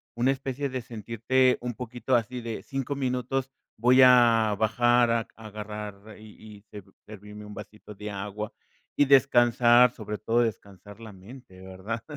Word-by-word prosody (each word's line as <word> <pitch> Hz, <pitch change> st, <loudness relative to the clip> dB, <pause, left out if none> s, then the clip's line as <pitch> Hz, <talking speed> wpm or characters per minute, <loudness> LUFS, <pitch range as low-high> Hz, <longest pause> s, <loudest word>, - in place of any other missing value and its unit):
una 120 Hz, +3 st, +1 dB
especie 135 Hz, +1 st, -3 dB
de 130 Hz, -2 st, -5 dB
sentirte 115 Hz, +3 st, 0 dB
un 120 Hz, 0 st, -5 dB
poquito 125 Hz, +1 st, -3 dB
así 120 Hz, +2 st, -1 dB
de 115 Hz, -1 st, -6 dB
5 135 Hz, 0 st, -4 dB
minutos, 130 Hz, 0 st, -2 dB, 0.3 s
voy 125 Hz, +3 st, +5 dB
a 115 Hz, -4 st, +5 dB
bajar 120 Hz, +2 st, +3 dB
a 115 Hz, -1 st, 0 dB
agarrar, 105 Hz, -1 st, -9 dB
y 110 Hz, 0 st, -14 dB
y -, -, -19 dB
ser 105 Hz, -2 st, -10 dB, 0.2 s
servirme 105 Hz, 0 st, -11 dB
un 105 Hz, 0 st, -11 dB
vasito 105 Hz, 0 st, -11 dB
de 105 Hz, +1 st, -7 dB
agua, 105 Hz, +2 st, -6 dB, 0.4 s
y 145 Hz, -, +3 dB
descansar, 120 Hz, -3 st, +5 dB
sobre 105 Hz, -3 st, -7 dB
todo 115 Hz, +3 st, +1 dB
descansar 105 Hz, -2 st, -6 dB
la 110 Hz, -2 st, -10 dB
mente, 95 Hz, 0 st, -14 dB
¿verdad? 95 Hz, +5 st, -7 dB
115 Hz, 155 wpm, -26 LUFS, 105-125 Hz, 0.4 s, voy